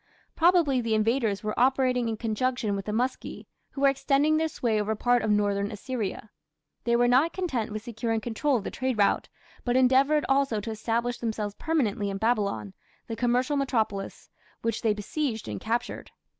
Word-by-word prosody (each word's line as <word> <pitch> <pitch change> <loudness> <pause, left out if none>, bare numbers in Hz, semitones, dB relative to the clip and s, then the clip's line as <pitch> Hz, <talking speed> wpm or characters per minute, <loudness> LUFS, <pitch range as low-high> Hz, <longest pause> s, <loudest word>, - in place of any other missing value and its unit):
Probably 330 -7 +4
the 225 -2 0
invaders 220 -1 +1
were 215 0 -2
operating 255 -2 +2
in 220 - -3
conjunction 230 0 -1
with 195 - -5
the 210 - -3
Muski, 250 +4 -3 0.2
who 275 - -7
were 280 - +6
extending 275 +2 +2
their 320 0 +1
sway 225 -8 0
over 215 +1 -1
part 245 +2 +2
of 220 - -1
northern 205 -1 +1
Assyria. 215 -2 -5 0.5
They 235 0 +3
were 245 +1 +4
not 265 +7 +3
content 260 - -2
with 215 0 -5
securing 225 -1 -2
control 245 +5 0
of 210 - -5
the - - -5
trade 260 -2 -2
route, 200 -1 +2 0.3
but 245 0 0
endeavoured 270 +4 +4
also 270 -5 +2
to 225 +2 -5
establish 235 +2 -2
themselves 215 -3 -3
permanently 220 -9 -1
in 195 - -3
Babylon, 200 - -1 0.3
the 225 - -5
commercial 250 +4 +1
metropolis, 220 -8 -2 0.4
which 230 -1 -1
they 215 -2 +2
besieged 225 +2 -3
and - - -5
captured. 230 +2 -3
235 Hz, 175 wpm, -27 LUFS, 215-260 Hz, 0.5 s, were